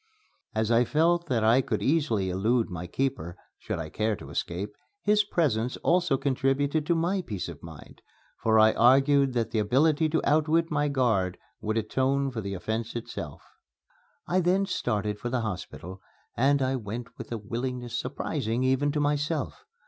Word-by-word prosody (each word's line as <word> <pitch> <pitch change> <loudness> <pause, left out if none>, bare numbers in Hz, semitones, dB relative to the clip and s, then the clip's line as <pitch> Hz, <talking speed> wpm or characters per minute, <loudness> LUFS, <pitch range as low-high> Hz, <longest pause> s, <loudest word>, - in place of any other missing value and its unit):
As 110 +1 0
I 120 +1 +5
felt 170 +6 +2
that 120 -5 +1
I 115 +4 +5
could - - -2
easily 130 - +1
elude 110 +4 +1
my 90 0 -5
keeper, 125 -7 -2 0.2
should - - -4
I 80 -2 -5
care 110 +3 0
to - - -11
escape, 95 +5 -3 0.3
his 210 0 +4
presence 130 - 0
also 175 -5 +2
contributed 140 +2 0
to 170 - +3
my 175 +4 0
peace 105 - -5
of 85 -4 -9
mind, 80 -2 -12 0.4
for 110 -1 +3
I 110 0 +6
argued 135 +2 +4
that 115 -2 -1
the 110 - 0
ability 145 +9 +3
to 160 +1 +1
outwit 160 +3 +2
my 145 -1 +1
guard 115 -10 +1 0.2
would 110 +1 -2
atone 135 +5 0
for 115 -3 -4
the 100 -1 -4
offence 110 +5 -3
itself. 120 - -6 0.8
I 185 - +2
then 185 +2 +2
started 105 - -2
for 120 - -3
the 125 -1 0
hospital; 95 -2 -6 0.3
and 140 +2 +3
I 130 0 0
went 115 +1 -7
with - - -8
a 115 - -2
willingness 120 +2 -4
surprising 115 +4 -2
even 130 +3 +2
to 150 - 0
myself. 145 - -1
125 Hz, 170 wpm, -27 LUFS, 110-145 Hz, 0.8 s, I